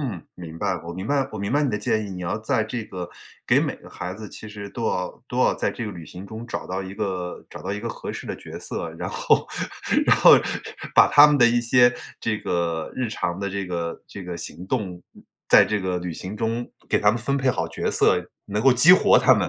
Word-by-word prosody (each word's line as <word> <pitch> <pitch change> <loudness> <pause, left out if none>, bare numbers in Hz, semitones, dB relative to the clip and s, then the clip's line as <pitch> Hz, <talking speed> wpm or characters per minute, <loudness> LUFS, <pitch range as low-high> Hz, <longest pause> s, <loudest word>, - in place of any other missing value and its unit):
嗯， 110 - -4
明 85 -2 -9
白， 95 -3 0
我 85 - -6
明 95 +3 -6
白 140 0 +1
我 110 - -6
明 100 +3 -2
白 145 +2 +3
你 140 - +1
的 105 - -1
建 110 +1 0
议， 100 - -7
你 90 -1 -6
要 90 +4 -2
在 110 0 0
这 110 0 -4
个 90 -3 -6 0.4
给 - - +4
每 - - -2
个 - - -15
孩 90 +1 -6
子 105 +2 -8
其 110 - -10
实 100 -1 -8
都 115 +3 -5
要 90 +5 -3
都 125 - -3
要 - - +4
在 - - -1
这 115 - -5
个 105 - -5
旅 85 -3 -9
行 90 +4 -10
中 110 +3 -8
找 - - -5
到 95 +1 -3
一 95 - -7
个 95 -4 -4
找 - - -10
到 100 - -3
一 105 - -3
个 115 +3 -4
合 - - -6
适 - - -7
的 - - -3
角 - - -9
色。 - - -5
然 - - -3
后 - - +2 0.6
然 - - +5
后 - - +8 0.6
把 - - +8
他 145 0 +9
们 145 -1 +3
的 120 - +7
一 120 0 +3
些 120 +1 +4 0.3
这 110 -2 -1
个 85 -4 -2
日 125 -3 -2
常 90 -4 -3
的 100 0 -2
这 100 0 -3
个 85 -2 -4
这 100 -3 -9
个 90 -1 -5
行 90 +2 -7
动， 95 -6 -2
嗯， - - -16 0.3
在 - - +8
这 105 -1 -1
个 90 -1 -1
旅 90 -1 -5
行 95 +6 -7
中， 115 +2 -2 0.2
给 - - +3
他 105 - +4
们 115 - -2
分 140 +4 -1
配 135 -1 +1
好 80 -8 0
角 80 - -3
色， - - +3 0.2
能 105 +1 -2
够 135 - +6
激 150 +9 +7
活 185 - +6
他 130 - +5
们。 100 -7 +2
105 Hz, 275 characters per minute, -24 LUFS, 90-120 Hz, 0.6 s, 他